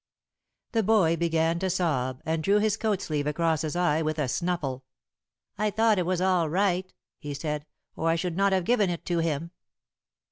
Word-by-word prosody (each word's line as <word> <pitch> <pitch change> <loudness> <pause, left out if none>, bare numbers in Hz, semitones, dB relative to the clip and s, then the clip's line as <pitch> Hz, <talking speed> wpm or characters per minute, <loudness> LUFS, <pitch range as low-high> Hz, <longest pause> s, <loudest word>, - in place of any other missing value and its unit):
The 225 - +2
boy 200 -6 +3
began 165 0 +1
to 190 +1 -1
sob, 140 -8 -1
and 160 0 0
drew 200 +5 +3
his 210 -1 +2
coat 215 -3 -1
sleeve 150 -2 -2
across 160 +1 +1
his 155 0 -3
eye 175 -3 +2
with 155 0 -1
a 150 -3 0
snuffle. 145 -4 -2 0.8
"I 215 0 +2
thought 220 -1 +2
it 175 - -1
was 185 -1 0
all 180 -4 +2
right," 185 +1 0 0.3
he 145 -2 -6
said, 150 +1 -4 0.3
"or 165 - 0
I 165 - +3
should 170 0 -2
not 195 +1 +2
have 190 -2 +1
given 215 -4 +3
it 170 -2 -4
to 175 -1 0
him." 165 0 -2
170 Hz, 190 wpm, -27 LUFS, 155-190 Hz, 0.8 s, boy